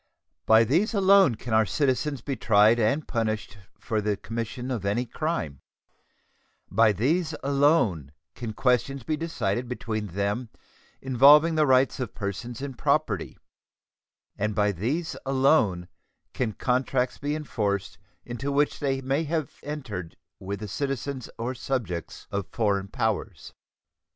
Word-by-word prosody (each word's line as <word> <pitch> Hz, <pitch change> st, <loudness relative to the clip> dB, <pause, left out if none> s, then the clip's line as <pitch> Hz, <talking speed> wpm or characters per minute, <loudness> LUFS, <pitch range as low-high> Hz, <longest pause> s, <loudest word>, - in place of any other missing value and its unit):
By 110 Hz, +1 st, +7 dB
these 175 Hz, -, +1 dB
alone 195 Hz, -, +5 dB
can 115 Hz, +1 st, -6 dB
our 110 Hz, -1 st, +4 dB
citizens 140 Hz, 0 st, 0 dB
be 135 Hz, +3 st, -3 dB
tried 110 Hz, 0 st, +4 dB
and 125 Hz, +8 st, +1 dB
punished 110 Hz, -3 st, -2 dB, 0.2 s
for 110 Hz, -3 st, -2 dB
the 105 Hz, -1 st, -1 dB
commission 115 Hz, +4 st, -5 dB
of 115 Hz, -6 st, -3 dB
any 105 Hz, +5 st, 0 dB
crime; 115 Hz, -, -3 dB, 1.1 s
by 110 Hz, -1 st, +5 dB
these 155 Hz, -, 0 dB
alone 140 Hz, -, +2 dB, 0.2 s
can 115 Hz, -3 st, -6 dB
questions 125 Hz, +2 st, +1 dB
be 155 Hz, -, -1 dB
decided 125 Hz, -8 st, -2 dB
between 110 Hz, -4 st, -3 dB
them 100 Hz, +6 st, -2 dB, 0.5 s
involving 140 Hz, +5 st, +6 dB
the 155 Hz, -1 st, +3 dB
rights 130 Hz, +1 st, +3 dB
of 130 Hz, -, -4 dB
persons 110 Hz, +5 st, -5 dB
and 135 Hz, -2 st, -5 dB
property, -, -, 0 dB, 1.0 s
and 105 Hz, 0 st, -1 dB
by 105 Hz, -1 st, +2 dB
these 130 Hz, -, -2 dB
alone 130 Hz, -, +2 dB, 0.5 s
can 115 Hz, -4 st, -1 dB
contracts 125 Hz, +1 st, 0 dB
be 145 Hz, +1 st, -2 dB
enforced 100 Hz, -, -2 dB, 0.3 s
into 125 Hz, +4 st, -4 dB
which 145 Hz, +1 st, +1 dB
they 135 Hz, -2 st, -1 dB
may 135 Hz, +4 st, 0 dB
have 155 Hz, -1 st, -3 dB
entered 120 Hz, -, -6 dB, 0.2 s
with 100 Hz, +1 st, -5 dB
the 105 Hz, -, -4 dB
citizens 135 Hz, +2 st, -3 dB
or 120 Hz, +3 st, -3 dB
subjects 120 Hz, -10 st, -4 dB
of 100 Hz, -3 st, -3 dB
foreign 100 Hz, -4 st, 0 dB
powers. 105 Hz, -3 st, -3 dB
120 Hz, 135 wpm, -26 LUFS, 105-140 Hz, 1.1 s, By